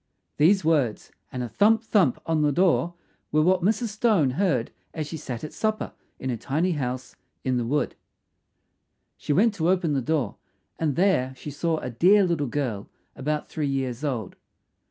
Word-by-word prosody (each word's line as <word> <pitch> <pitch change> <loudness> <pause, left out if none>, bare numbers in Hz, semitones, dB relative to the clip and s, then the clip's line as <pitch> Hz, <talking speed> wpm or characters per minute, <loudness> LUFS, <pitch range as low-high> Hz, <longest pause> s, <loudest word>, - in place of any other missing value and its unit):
These 170 +4 +4
words, 145 -9 +1 0.2
and 125 -1 -3
a - - -3
thump! 220 - +3
thump! 190 - +2
on 160 -1 +1
the 150 -1 +3
door 175 +1 +2 0.4
were 155 +1 +3
what 185 +2 +3
Mrs. 220 +5 +1
Stone 210 - +2
heard 145 - 0 0.2
as 155 -2 -2
she 155 - -6
sat 130 -6 -6
at 155 - -6
supper 215 0 -2 0.2
in 130 - -3
her 120 - -2
tiny 160 +10 0
house 130 -4 -3 0.3
in 130 -1 0
the 120 - -1
wood. 145 +1 0 1.2
She - - -4
went 210 +8 +4
to 170 -4 0
open 180 -5 +2
the 135 - +1
door, 140 -5 -1 0.4
and 150 -4 0
there 150 -9 +2
she 150 - -8
saw 160 +3 -1
a 125 - -5
dear 190 - +5
little 170 -6 0
girl 120 -7 -3 0.3
about 150 +3 -2
three 150 -2 -2
years 135 -1 -2
old. 120 -9 -3
150 Hz, 175 wpm, -25 LUFS, 130-180 Hz, 1.2 s, dear